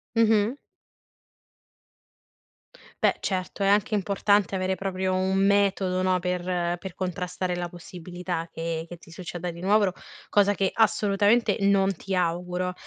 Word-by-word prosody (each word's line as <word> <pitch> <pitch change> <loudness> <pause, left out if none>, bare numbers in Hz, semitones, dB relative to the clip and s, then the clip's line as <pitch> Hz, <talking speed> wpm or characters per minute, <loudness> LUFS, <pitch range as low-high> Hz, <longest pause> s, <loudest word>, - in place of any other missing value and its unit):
Mh-mh. 225 +1 +3 2.5
Beh, - - +3
certo, 185 0 -3
è - - +3
anche 205 +4 +2
importante 200 -1 +2
avere 190 0 0
proprio 190 -1 -2
un 190 +1 +1
metodo, 195 -2 +2
no, 185 0 +2
per 180 0 -2 0.4
per 185 -1 -8
contrastare 180 0 -3
la 175 0 -3
possibilità 175 0 -6
che 165 0 -4
che 175 - -9
ti 165 - -17
succeda 175 0 -5
di 170 - -11
nuovo, 200 0 +3 0.4
cosa 205 0 +4
che 195 0 0
assolutamente 210 +1 +3
non 195 -1 +3
ti 190 +2 -4
auguro. 180 +1 -1
185 Hz, 130 wpm, -26 LUFS, 180-200 Hz, 2.5 s, cosa